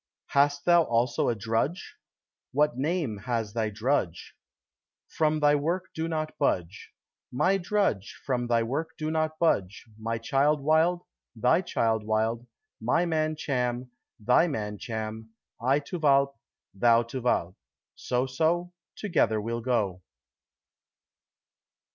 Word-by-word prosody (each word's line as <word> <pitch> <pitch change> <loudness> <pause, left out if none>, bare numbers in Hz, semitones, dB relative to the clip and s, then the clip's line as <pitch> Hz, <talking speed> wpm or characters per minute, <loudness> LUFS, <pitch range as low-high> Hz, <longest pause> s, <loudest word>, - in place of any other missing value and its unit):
"Hast 145 0 +2
thou 175 -1 +6
also 120 -3 +1
a 120 - 0
drudge? 115 - -2 0.6
what 150 +1 +2
name 145 - -1
has 110 -1 -2
thy 110 -2 0
drudge?" 105 - -1 0.7
"From 155 -1 +1
thy 145 0 +5
work 170 +6 -1
do 160 +1 -2
not 155 -1 -3
budge." 90 - -1 0.4
"My 190 +10 +2
drudge, 180 - -1
From 125 -3 -1
thy 115 -1 +2
work 155 +8 -3
do 155 0 -2
not 155 0 -1
budge: 105 - 0
my 115 +1 -2
child 140 +6 +2
Wild, 160 +4 +2 0.3
thy - - +3
child 110 -1 0
Wild; 110 +2 -1 0.3
my 145 +10 +2
man 155 -2 0
Cham, 125 -4 -2 0.3
thy 125 +10 +4
man 105 - -4
Cham; 110 0 -6 0.3
I 130 +4 +3
to 170 +5 -6
Walpe, 140 -2 +3 0.4
thou 115 +3 +4
to 120 +3 -6
Walpe; 90 -7 0 0.4
so, 125 +1 -1
so, 165 +7 0 0.2
together 165 - +1
we'll 115 +2 -3
go." 105 -7 0
130 Hz, 130 wpm, -27 LUFS, 115-155 Hz, 0.7 s, thou